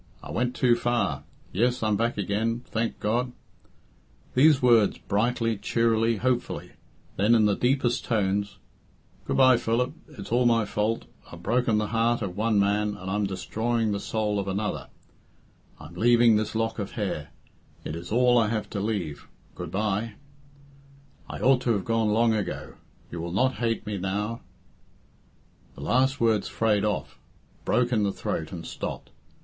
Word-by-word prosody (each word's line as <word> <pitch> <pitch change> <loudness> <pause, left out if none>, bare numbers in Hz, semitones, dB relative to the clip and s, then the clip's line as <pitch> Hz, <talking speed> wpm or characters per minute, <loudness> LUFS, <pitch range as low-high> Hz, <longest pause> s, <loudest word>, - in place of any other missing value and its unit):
I - - -8
went 125 +1 -1
too 125 -2 +4
far 120 0 0 0.3
yes, 120 +4 +1
I 110 - +2
am 105 - +2
back 115 +3 0
again, 110 +4 -1
thank 115 +1 -2
God 120 +4 -1 0.5
" - - -34
These 145 +2 +5
words 120 -5 +4
brightly, 115 +1 0
cheerily, 115 +2 +1
hopefully; 125 +2 -1 0.5
then, 105 +4 +4
in 110 -2 +4
the 105 -1 +3
deepest 125 0 +1
tones, 100 -2 0 0.7
"Good - - -1
bye, 130 -2 +6
Philip 120 +4 0 0.2
it's 100 - -8
all 120 +1 +3
my 115 -2 +3
fault 105 +2 -1 0.3
I've 85 0 -11
broken 115 +1 +2
the 105 -1 -1
heart 115 0 +2
of 90 -3 -4
one 110 0 +2
man, 105 +1 +1
and 95 0 -6
I'm 105 0 0
destroying 110 +4 -1
the 100 - -1
soul 105 -1 -1
of 100 - -3
another 100 +2 -2 0.9
I'm 75 +3 -11
leaving 120 +4 +5
this 110 +1 -1
lock 115 0 -1
of 100 - -4
hair 95 -9 -3 0.5
it 75 - -5
is 85 +3 -8
all 125 +1 +4
I 110 - +2
have 110 -1 -3
to 100 - -3
leave 100 -8 -3 0.3
good 90 -2 -7
bye! 105 +3 -1 1.1
I - - -6
ought 130 -1 +4
to 120 -2 +1
have 100 -3 -2
gone 115 -1 +1
long 115 +2 +3
ago 105 -3 -3 0.4
you 85 - -5
will 85 +1 -5
not 130 +6 +1
hate 115 -2 -1
me 105 -2 -3
now 105 +5 -2 0.7
" - - -33
The - - -10
last 130 - +2
words 115 -2 +2
frayed 105 -2 +1
off, 105 -2 -2 0.5
broke 125 0 +2
in 110 -3 +2
the 100 -1 +1
throat, 80 -4 -4
and 85 -2 -7
stopped. - - -6
110 Hz, 170 wpm, -26 LUFS, 100-120 Hz, 1.1 s, bye